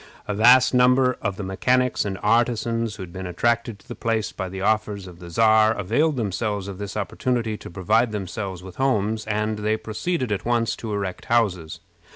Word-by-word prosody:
A 105 - -1
vast 125 +5 +6
number 125 0 +4
of 100 -3 -2
the 105 - -4
mechanics 125 +7 +1
and 95 -1 -3
artisans 115 0 +1
who 95 - -7
had 85 -2 -11
been 95 -1 -5
attracted 115 +3 0
to - - -24
the - - -6
place 115 -2 -1
by 95 -2 -5
the 95 +1 -6
offers 105 -1 0
of 90 -2 -12
the 85 -1 -10
Czar 110 +3 +4
availed 145 - +1
themselves 105 -2 -2
of 100 -1 -7
this 100 +1 -5
opportunity 115 +2 -1
to - - -10
provide 105 +6 +1
themselves 95 -2 -5
with 95 -1 -11
homes, 110 -5 0
and 105 0 -1
they 110 +1 0
proceeded 125 +4 -3
at 105 0 -1
once 120 -1 +1
to 110 - -6
erect 100 -3 -4
houses. 95 -9 0
110 Hz, 190 wpm, -23 LUFS, 100-120 Hz, -, vast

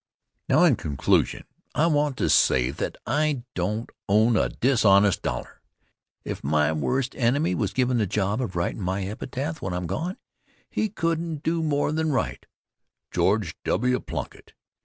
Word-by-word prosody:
Now, - - +5
in - - +5
conclusion, 70 -3 +1 0.3
I 155 - +3
want 145 -4 +1
to - - +1
say 65 0 +4
that 70 - -4
I 145 -1 0
don't 105 +6 -2 0.2
own 110 +3 +4
a - - +2
dishonest 105 -6 +3
dollar. - - -5 0.6
If - - -5
my 75 +2 +2
worst 125 - -1
enemy 130 - +1
was 95 +2 -1
given 125 +2 +1
the 105 - +1
job 100 +5 0
of 100 -8 -4
writin' 85 +5 -2
my 95 +1 -1
epitaph 135 +10 -4
when 95 - -3
I'm 90 0 -3
gone, 175 - -3 0.5
he 215 - 0
couldn't 165 -5 -2
do 165 +1 0
more 150 -2 +1
than 160 0 0
write: 135 - -2 0.6
"George - - +1
W. 125 0 +1
Plunkitt. - - -7
120 Hz, 155 wpm, -25 LUFS, 95-150 Hz, 0.6 s, Now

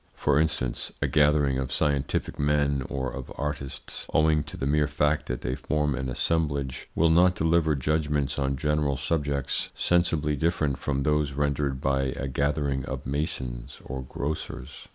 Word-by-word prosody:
For 70 - +2
instance, 75 -6 0
a - - +1
gathering 75 -3 +3
of 65 - -3
scientific 70 -3 0
men 70 -1 +2
or 65 -2 -2
of 65 -2 -7
artists, 75 -2 -4
owing 75 0 +4
to - - -8
the - - -2
mere 75 +1 +2
fact 75 +1 +1
that 60 0 -3
they 60 - -2
form 75 +2 0
an 65 0 -3
assemblage, 70 -1 -1
will 80 0 +4
not 90 +2 +5
deliver 80 -2 +2
judgments 75 -1 0
on 70 -1 0
general 75 0 +1
subjects 70 -4 -1
sensibly 80 -4 +2
different 75 -2 0
from 70 -1 -1
those 75 -1 +1
rendered 70 -1 0
by 65 0 +1
a 70 - -2
gathering 70 0 0
of - - -5
masons 65 -4 -3
or 65 0 -4
grocers. 70 +4 -5
70 Hz, 155 wpm, -27 LUFS, 70-75 Hz, -, not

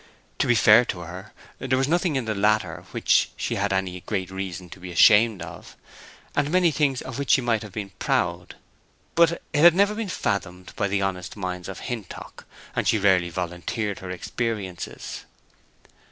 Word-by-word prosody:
To - - +2
be 120 - +4
fair 110 +1 +7
to 90 -5 -4
her, 90 +3 -9 0.3
there 130 0 0
was 135 +1 +1
nothing 175 0 +1
in 130 -3 -1
the 110 - -1
latter 105 -4 0
which - - +2
she - - -2
had - - -1
any 95 -1 -1
great 95 0 -3
reason 95 -2 -5
to - - -10
be 90 0 -8
ashamed 105 +1 +5
of, - - -11 0.6
and 145 0 +1
many 180 0 +3
things 140 -3 0
of 130 0 -6
which 140 - -4
she - - +4
might 115 -3 +1
have 105 -2 -9
been 100 -2 -5
proud; 90 0 -1 0.6
but 170 0 +5
it - - -9 0.2
had 170 0 +8
never 200 +2 +3
been 215 -2 -4
fathomed 95 - -3
by 100 - 0
the 100 0 0
honest 95 0 -4
minds 90 -2 -4
of 95 - -7
Hintock, 115 -7 -7 0.3
and - - 0
she 115 - +4
rarely 95 -4 +3
volunteered 90 +4 -3
her 95 - -8
experiences. 95 0 -5
100 Hz, 180 wpm, -24 LUFS, 90-125 Hz, 0.6 s, had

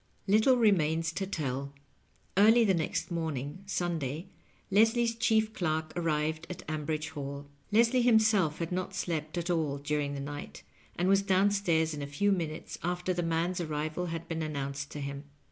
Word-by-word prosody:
IV. 195 - 0
Little 235 +4 +5
remains 165 -7 +3
to 195 +2 -2
tell. 140 -6 -3 0.6
Early 225 +4 +6
the 195 - +4
next 165 +1 -1
morning, 160 -1 -3
Sun 175 -3 -1
day, 150 +7 -4 0.4
Leslie's 225 +3 +4
chief 220 -1 +2
clerk 160 -4 -1
arrived 155 -1 -1
at 180 - -7
Ambridge 155 0 -2
Hall. 140 -2 -6 0.3
Les 230 +3 +4
lie 255 - +4
himself 220 -9 +4
had 170 0 -3
not 185 +1 -3
slept 160 -3 -3
at 175 +1 -1
all 155 -5 0
during 145 0 -2
the - - -4
night, 140 - -7 0.3
and 180 - 0
was 195 +1 +5
down 195 +1 +3
stairs 165 -6 +1
in 145 - -5
a 140 - -4
few 200 +9 +1
minutes 165 -4 -3
after 180 +1 -1
the 175 - -1
man's 170 +2 0
arrival 155 +2 -2
had 165 0 -5
been 165 -1 -3
announced 140 -2 -3
to 150 - -6
him. 140 +1 -5
165 Hz, 180 wpm, -30 LUFS, 150-195 Hz, 0.6 s, Early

